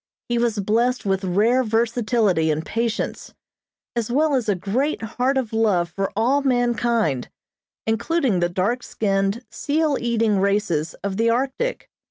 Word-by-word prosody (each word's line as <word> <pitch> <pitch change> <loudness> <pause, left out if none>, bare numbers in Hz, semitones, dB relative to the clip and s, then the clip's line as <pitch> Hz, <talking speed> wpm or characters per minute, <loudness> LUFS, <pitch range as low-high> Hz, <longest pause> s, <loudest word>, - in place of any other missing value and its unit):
He 240 0 +1
was 235 -2 +1
blessed 230 +5 +1
with 195 0 0
rare 215 +8 +2
versatility 225 -6 +1
and 155 +1 -1
patience, 230 -1 -3 0.6
as 235 -2 -1
well 300 +3 +2
as 245 -5 0
a 205 - +3
great 235 - -1
heart 250 +4 0
of 240 -4 -2
love 195 -6 +2
for 195 +2 -2
all 250 +7 +2
mankind, 240 - +1 0.6
including 225 - +1
the 175 0 +1
dark 200 +8 0
skinned, 200 +1 -1
seal 300 0 0
eating 225 -4 +1
races 195 -6 0
of 195 -1 -2
the 230 +1 +2
Arctic. 270 - -1
225 Hz, 145 wpm, -22 LUFS, 195-245 Hz, 0.6 s, a